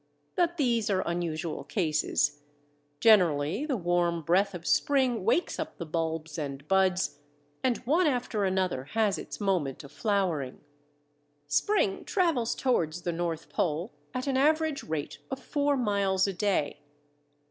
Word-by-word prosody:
But 345 -1 +1
these 235 -6 +1
are 190 -2 +1
unusual 170 -2 -3
cases. 150 -5 0 0.6
Generally 180 - +4
the 270 -5 0
warm 175 -2 +1
breath 190 +5 +2
of 170 -1 -8
spring 260 -7 +2
wakes 350 - +1
up 315 0 -5
the 170 - -5
bulbs 160 0 -3
and 140 -1 -5
buds, 190 -1 +2 0.4
and 255 -2 +2
one 320 +7 +3
after 245 -6 0
another 185 -8 0
has 215 -3 +2
its - - -8
moment 180 -11 -1
of 140 - -12
flowering. 185 - -1 0.8
Spring 145 - +1
travels 330 - +1
towards 175 -10 0
the 175 - -1
North 165 -1 -3
Pole 170 +5 -1 0.2
at 255 0 -3
an 270 -2 0
average 310 +1 +2
rate 155 -2 -4
of 265 - -3
four 285 +1 0
miles 200 -5 +2
a 195 - -1
day. 185 -5 0
190 Hz, 140 wpm, -29 LUFS, 165-250 Hz, 0.8 s, Generally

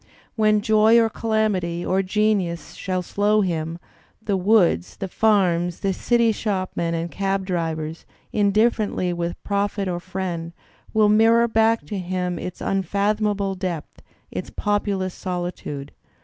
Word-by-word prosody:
When 215 -1 +3
joy 220 +1 +5
or 225 -1 +3
calamity 205 -7 0
or 190 +1 +2
genius 195 -3 0
shall 185 -1 -3
show 205 +3 +2
him 165 -3 -2 0.4
it, - - -31
the 205 - +1
woods, 180 - +2
the 195 - -4
farms, 180 -5 +2
the 195 -1 +1
city 235 +3 +2
shopmen 185 -5 -2
and 165 +1 -3
cab 195 0 -1
drivers, 165 -3 -3 0.3
indifferently 210 -3 +2
with 170 0 -3
prophet 200 0 -1
or 175 -1 -2
friend, 175 -2 -4 0.4
will 215 -1 +4
mirror 225 +2 +5
back 225 0 +2
to 205 -3 -4
him 180 -1 -2
its 180 - -6
unfathom 200 +3 0
able 200 -1 -1
depth, 180 -4 -5 0.3
its - - -5
populous 200 -3 -1
solitude." 175 -6 -5
195 Hz, 135 wpm, -23 LUFS, 175-215 Hz, 0.4 s, joy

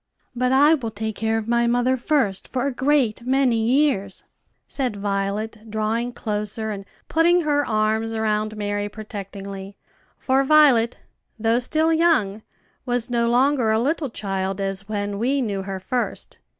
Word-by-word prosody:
"But 250 +1 +1
I 290 +4 +6
will 255 -8 -1
take 220 0 -4
care 225 +1 0
of 220 -1 -4
my 235 0 +2
mother 245 +2 +2
first, 245 -7 0
for 255 0 -2
a 280 - 0
great 260 -4 +1
many 255 -1 +2
years," 240 -6 +1 0.4
said 255 -6 -3
Violet, 205 +2 -3
drawing 220 +3 -1
closer, 215 -1 -3
and 200 -1 -6 0.2
putting 345 +2 +3
her 290 -2 +1
arms 220 -1 0
around 215 -1 -1
Mary 205 0 -2
protectingly; 200 -2 -8 0.4
for 265 +1 +2
Violet, 270 -5 +5 0.4
though 225 +2 +2
still 315 +6 +1
young, 310 -12 +2 0.4
was 245 0 -1
no 235 -1 +1
longer 250 -1 +3
a 220 - +3
little 285 +4 0
child, 195 -3 -3
as 195 +1 -3
when 205 -1 -3
we 265 +5 +1
knew 205 -6 -2
her 190 0 -5
first. 245 +6 -3
225 Hz, 150 wpm, -22 LUFS, 205-260 Hz, 0.4 s, I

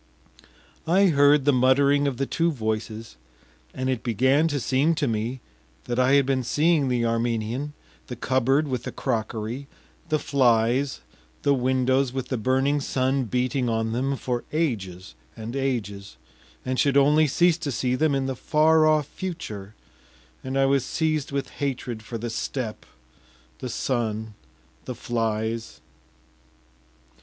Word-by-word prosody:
I 190 +3 +4
heard 145 -2 +4
the 145 - +4
muttering 140 +3 +3
of 135 -3 -2
the 135 - 0
two 170 +4 0
voices, 110 - -4 0.5
and 130 0 -4
it 130 -3 -1
began 130 +7 +2
to 145 -3 -1
seem 135 +6 +1
to 150 -2 0
me 115 +3 -2 0.4
that 120 0 -2
I 130 +1 +4
had 140 -1 +5
been 135 -1 +1
seeing 150 +4 +2
the 120 -2 +1
Armenian, 115 +4 -1 0.3
the 125 - -6
cupboard 130 +4 +1
with 130 -4 -2
the - - -6
crockery, 115 +4 -3 0.4
the 155 - +2
flies, 130 -1 +2 0.4
the 140 - +4
windows 130 0 +1
with 130 -1 -4
the 130 - -1
burning 130 +5 +1
sun 130 0 0
beating 125 +2 0
on 115 0 -1
them, 135 +4 -1
for 125 -2 -3
ages 95 - -2 0.2
and 115 +3 -6
ages, 100 - -3 0.5
and 130 0 -1
should 140 -1 +3
only 150 +2 +5
cease 175 +4 +3
to 150 -4 -3
see 125 0 -1
them 150 +2 +2
in 135 -1 0
the 135 0 -2
far 155 +4 +3
off 155 -1 +3
future, 110 - -7 0.7
and 130 +1 -3
I 135 - +4
was 135 -1 +2
seized 155 +1 -1
with 140 -1 -2
hatred 125 -5 -3
for 115 +2 -6
the 115 +1 -4
steppe, 115 -1 -4 0.7
the 125 - -5
sun, 110 -3 -2 0.5
the 125 - -5
flies.... 115 -1 -2
130 Hz, 150 wpm, -25 LUFS, 115-140 Hz, 0.7 s, had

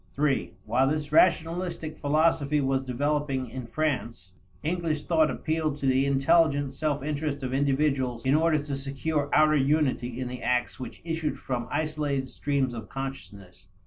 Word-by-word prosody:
(iii) 145 -2 +1
While 130 +3 +2
this 150 0 -2
rationalistic 165 -1 +2
philosophy 150 0 +2
was 135 -1 +1
developing 135 0 -1
in 130 -2 -6
France, 120 - -2 0.3
English 160 -2 -1
thought 160 -3 +3
appealed 155 -2 -1
to 145 - -5
the 135 +1 +3
intelligent 140 0 +3
self 145 -2 -1
interest 145 -1 -2
of 130 0 -3
individuals 135 -3 +1
in 135 - +3
order 160 +1 +3
to 145 -1 -3
secure 140 +2 -2
outer 155 0 +5
unity 135 -4 +1
in 130 - -2
the 125 0 -6
acts 125 +1 0
which 130 - -8
issued 160 -2 -2
from 125 -2 -3
isolated 145 -3 -1
streams 140 -3 -1
of 110 -4 -7
consciousness. 110 -9 -8
145 Hz, 150 wpm, -27 LUFS, 130-155 Hz, 0.3 s, outer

